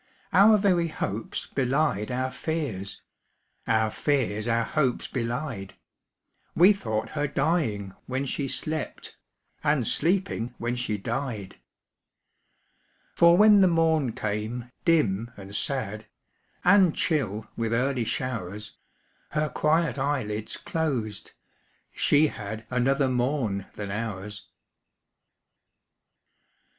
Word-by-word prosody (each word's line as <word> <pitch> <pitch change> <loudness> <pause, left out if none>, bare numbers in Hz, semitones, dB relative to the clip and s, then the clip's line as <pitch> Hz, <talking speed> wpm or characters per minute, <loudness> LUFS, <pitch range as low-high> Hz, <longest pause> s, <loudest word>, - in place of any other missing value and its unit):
Our 215 +2 +7
very 185 -4 +2
hopes 110 -8 -4
belied 135 -5 0
our 130 +1 -1
fears, 135 - -4 0.6
Our 110 -1 +2
fears 120 -7 0
our 115 0 +2
hopes 135 -2 0
belied 120 -4 -4 0.8
We 185 +5 +7
thought 110 - -3
her 145 -1 -1
dying 135 - 0
when 130 +2 -2
she 140 +1 -2
slept, 155 +3 -4 0.5
And 150 -5 +2
sleeping 165 -9 0
when 120 +1 -2
she 120 -4 -2
died. 110 -2 -4 1.6
For 170 0 +6
when 210 0 +7
the 190 - +6
morn 160 -7 +2
came, 110 +4 -3
dim 120 - +2
and 100 0 -8
sad, 110 -6 -2 0.6
And 185 -2 +5
chill 110 - -1
with 115 -1 -2
early 125 +1 +1
showers, 105 -5 -4 0.5
Her 150 0 0
quiet 155 0 +1
eyelids 115 -7 -2
closed 125 -11 -3 0.6
she 145 +2 +4
had 110 -4 -5
Another 135 +3 +2
morn 125 -6 -1
than 105 -1 -5
ours. 105 -1 -5
125 Hz, 105 wpm, -26 LUFS, 110-155 Hz, 1.6 s, Our